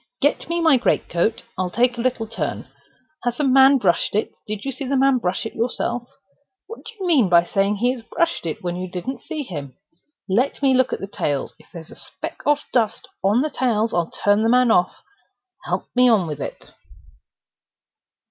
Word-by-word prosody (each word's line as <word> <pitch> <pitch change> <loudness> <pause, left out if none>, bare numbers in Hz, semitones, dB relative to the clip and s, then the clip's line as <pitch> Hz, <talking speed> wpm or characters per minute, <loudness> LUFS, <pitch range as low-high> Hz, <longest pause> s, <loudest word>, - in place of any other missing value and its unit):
"Get 290 +2 0
me 340 0 0
my 320 -5 +5
great 235 -6 +1
coat; 175 +6 0 0.2
I'll 185 -1 0
take 240 +5 +2
a 240 - -4
little 245 -2 -1
turn. 225 +1 -4 0.6
Has 240 0 -1
the 300 - 0
man 270 +1 +6
brushed 175 -5 +1
it? 210 - -1
Did 210 +1 -4
you 275 - -1
see 270 +1 -4
the 275 +1 0
man 270 -1 +4
brush 180 -2 -2
it 225 - -5
yourself? 240 +1 -2 0.6
What 450 +4 -10
do - - -7
you 380 - -3
mean 280 - +3
by 170 -1 +6
saying 195 +3 0
he 245 +5 +1
has 255 -2 -6
brushed 335 - -1
it, 160 - -5
when 175 -1 -2
you 185 0 -5
didn't 210 +9 -5
see 310 -2 -4
him? 145 - -8 0.5
Let 235 +8 +1
me 270 -1 +5
look 260 0 +3
at - - -3
the 195 - -4
tails. 145 -8 -2
If - - -20
there's 165 -3 -10
a - - -11
speck - - -7
of 295 0 +3
dust 230 -4 0 0.2
on 205 +6 +3
the 305 +1 -1
tails, 230 -4 0
I'll 170 -1 0
turn 205 +1 +1
the 225 - +2
man 250 -1 +4
off!—Help 365 - -3
me 250 0 +5
on 210 -6 +3
with 150 -3 -5
it." - - -8
235 Hz, 205 wpm, -22 LUFS, 190-265 Hz, 0.6 s, man